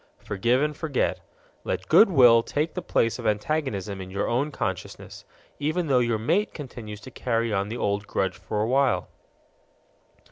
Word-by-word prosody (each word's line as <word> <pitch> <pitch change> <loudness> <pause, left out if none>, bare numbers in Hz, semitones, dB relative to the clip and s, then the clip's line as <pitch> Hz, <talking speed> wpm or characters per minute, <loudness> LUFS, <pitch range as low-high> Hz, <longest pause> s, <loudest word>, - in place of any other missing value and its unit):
Forgive 120 +7 0
and 150 0 -1
forget. 150 -3 -1 0.4
Let - - -3
good 215 - +7
will 120 -8 +6
take 150 +7 -2
the - - -4
place 115 - 0
of - - -3
antagonism 105 -4 -1
in 95 - -8
your 100 +2 -2
own 130 +5 0
consciousness, - - -5 0.3
even 155 +4 0
though 135 -4 +3
your 120 -2 +1
mate 175 - 0
continues 115 -7 -8
to 130 - -11
carry 115 -3 -1
on 100 0 -1
the 115 - -4
old 100 -2 -1
grudge 95 -2 -1
for 105 -1 -2
a - - -1
while. 135 +1 +1
120 Hz, 170 wpm, -25 LUFS, 105-145 Hz, 0.4 s, good